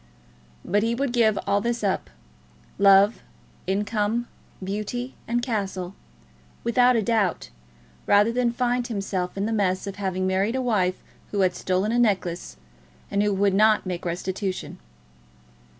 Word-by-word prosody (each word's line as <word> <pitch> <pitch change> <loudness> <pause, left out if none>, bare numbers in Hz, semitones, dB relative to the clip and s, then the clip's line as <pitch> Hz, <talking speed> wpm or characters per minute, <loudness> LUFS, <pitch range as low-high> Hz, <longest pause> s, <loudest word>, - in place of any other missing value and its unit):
But 205 +2 +2
he 230 +2 0
would 270 0 -1
give 220 -4 +3
all 200 +1 +2
this 235 0 -2
up, 195 -2 -1 0.7
love, 200 +2 +5 0.5
income, 210 +4 0 0.4
beauty, 215 +6 -4
and 240 +1 0
castle, 195 -6 -3 0.7
without 245 +1 +4
a 225 - +2
doubt, 200 - 0 0.6
rather 205 +2 +5
than 240 0 +1
find 245 0 0
himself 195 -4 -3
in 200 - 0
the 225 - -1
mess 190 -3 0
of 200 0 -6
having 185 -2 -2
married 190 +5 +1
a - - 0
wife 185 -6 0 0.3
who 205 - -1
had 185 -1 +3
stolen 185 +4 0
a 240 - +2
necklace, 185 - 0 0.5
and 200 - +1
who 210 0 +2
would 200 0 +2
not 215 +1 +4
make 180 -2 -4
restitution. 185 +2 -4
205 Hz, 145 wpm, -24 LUFS, 190-235 Hz, 0.7 s, love